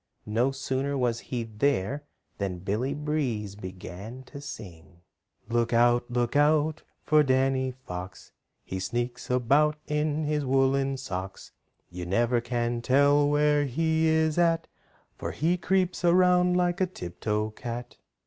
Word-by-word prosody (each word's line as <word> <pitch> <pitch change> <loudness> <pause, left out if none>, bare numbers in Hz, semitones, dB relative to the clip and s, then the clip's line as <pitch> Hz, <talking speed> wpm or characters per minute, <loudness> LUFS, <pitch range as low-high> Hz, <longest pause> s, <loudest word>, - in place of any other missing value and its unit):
No 115 +5 +1
sooner 135 +1 -2
was 120 -3 0
he 120 -2 -4
there 125 +4 -1 0.3
than 95 -3 -2
Billy 110 +9 -2
Breeze 140 -9 -2
began 95 +5 -8
to 140 +2 -10
sing: 90 - -10 0.5
"Look 120 +1 0
out, 120 +1 +3
look 120 +1 -1
out 150 +1 +3 0.2
for 155 0 +4
Danny 130 -1 +2
Fox! 95 -8 -8 0.3
He 95 - -5
sneaks 120 +6 -3
about 140 +5 +3
in 150 +1 0
his 150 -1 0
woolen 135 0 +2
socks, 95 -6 -6 0.4
You 90 0 -6
never 120 +5 +2
can 120 0 -1
tell 145 +3 +4
where 150 0 +3
he 160 +4 +1
is 160 0 +2
at, 165 -1 +2 0.5
For - - -3
he 165 +4 +1
creeps 180 0 0
around 180 0 +4
like 180 +1 +1
a 185 - +3
tip 90 - -9
toe 105 0 -1
cat." 120 +2 -7
130 Hz, 140 wpm, -27 LUFS, 115-150 Hz, 0.5 s, for